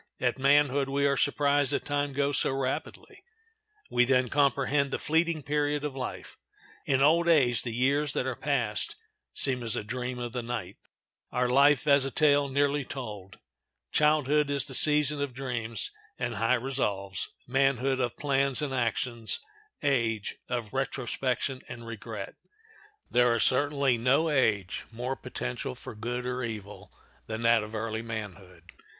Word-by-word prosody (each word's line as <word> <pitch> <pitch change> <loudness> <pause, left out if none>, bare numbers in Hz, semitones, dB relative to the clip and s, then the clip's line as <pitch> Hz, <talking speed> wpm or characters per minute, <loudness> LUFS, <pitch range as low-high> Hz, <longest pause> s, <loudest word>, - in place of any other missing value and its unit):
At - - 0
manhood 140 0 +3
we 140 +1 +1
are 140 0 +3
surprised 145 0 +2
that - - -1
time 145 0 -1
goes 140 0 +1
so - - +1
rapidly; 135 -1 -4 0.7
we 125 - +4
then 125 -1 +2
comprehend 140 0 +2
the - - -2
fleeting 160 0 0
period 145 +1 0
of 145 -3 -4
life. 130 -2 -6 0.5
In 135 -1 +3
old 170 +4 +4
age 125 -8 +4
the 120 - -4
years 135 +4 +1
that - - -1
are 130 -2 -2
passed 125 -8 -1 0.4
seem 130 -2 +2
as 115 -2 +1
a - - -2
dream 125 +3 -4
of 120 -1 -5
the 125 - -2
night, 120 -5 -5 0.5
our 125 0 +1
life 140 +3 +4
as 140 -2 +5
a 135 - -1
tale 145 0 +4
nearly 140 +1 +1
told. 105 -8 -8 0.5
Childhood 150 -1 +3
is 140 -2 +1
the 135 - -6
season 150 +2 +4
of 140 -3 -3
dreams 115 -5 -3 0.3
and - - -2
high 115 +3 +3
resolves; 105 -7 -2 0.2
manhood, 135 0 +1
of 120 -2 -2
plans 140 0 +1
and 140 -2 -2
actions; 120 -2 -1 0.4
age, 115 -7 0
of 120 -3 -3
retrospection 130 0 -2
and 120 -1 -8
regret. 110 -3 -7 0.8
There 120 -1 +4
is 115 - +2
certainly 140 -2 +2
no 140 +7 +2
age 105 -9 0
more 125 +3 -3
potential 60 - -5
for - - -9
good 120 +3 -4
or 125 0 -2
evil 105 -4 -7 0.4
than 110 +1 -4
that 115 -1 +5
of 105 +1 -7
early 110 0 -3
manhood. 95 -6 -7
130 Hz, 155 wpm, -28 LUFS, 115-140 Hz, 0.8 s, as